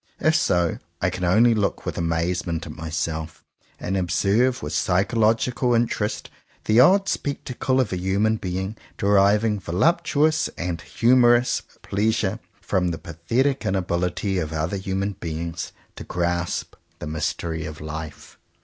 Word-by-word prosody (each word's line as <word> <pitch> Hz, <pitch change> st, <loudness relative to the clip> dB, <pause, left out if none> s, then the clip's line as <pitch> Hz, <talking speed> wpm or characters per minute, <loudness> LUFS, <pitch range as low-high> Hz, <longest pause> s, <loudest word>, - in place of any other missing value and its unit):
If 155 Hz, 0 st, +3 dB
so, 90 Hz, -, +1 dB, 0.2 s
I -, -, +1 dB
can 90 Hz, -, -5 dB
only 110 Hz, +7 st, +5 dB
look 105 Hz, -3 st, -1 dB
with -, -, -3 dB
amazement 85 Hz, 0 st, -1 dB
at 80 Hz, -, -7 dB
myself, 80 Hz, 0 st, -4 dB, 0.4 s
and 95 Hz, -, -2 dB
observe 100 Hz, -, +1 dB
with 75 Hz, +1 st, -4 dB
psychological 115 Hz, -, +2 dB
interest 115 Hz, -2 st, -1 dB, 0.3 s
the 110 Hz, +2 st, +4 dB
odd 195 Hz, +9 st, +6 dB
spectacle 130 Hz, -2 st, -1 dB
of 115 Hz, -7 st, 0 dB
a -, -, -1 dB
human 100 Hz, +4 st, +1 dB
being 95 Hz, +2 st, -4 dB, 0.2 s
deriving 105 Hz, +2 st, +3 dB
voluptuous 155 Hz, -, +2 dB
and 85 Hz, -1 st, -3 dB
humourous 120 Hz, 0 st, +3 dB, 0.2 s
pleasure 110 Hz, 0 st, 0 dB, 0.2 s
from 95 Hz, -2 st, 0 dB
the 85 Hz, -2 st, -2 dB
pathetic 115 Hz, -, -1 dB
inability 90 Hz, +1 st, -1 dB
of 80 Hz, -2 st, -3 dB
other 80 Hz, +5 st, -2 dB
human 95 Hz, +1 st, -2 dB
beings 85 Hz, 0 st, -4 dB, 0.3 s
to -, -, -6 dB
grasp 85 Hz, 0 st, -2 dB, 0.2 s
the -, -, -7 dB
mystery 80 Hz, +1 st, -3 dB
of 75 Hz, 0 st, -8 dB
life. 80 Hz, 0 st, -8 dB
95 Hz, 130 wpm, -23 LUFS, 85-115 Hz, 0.4 s, odd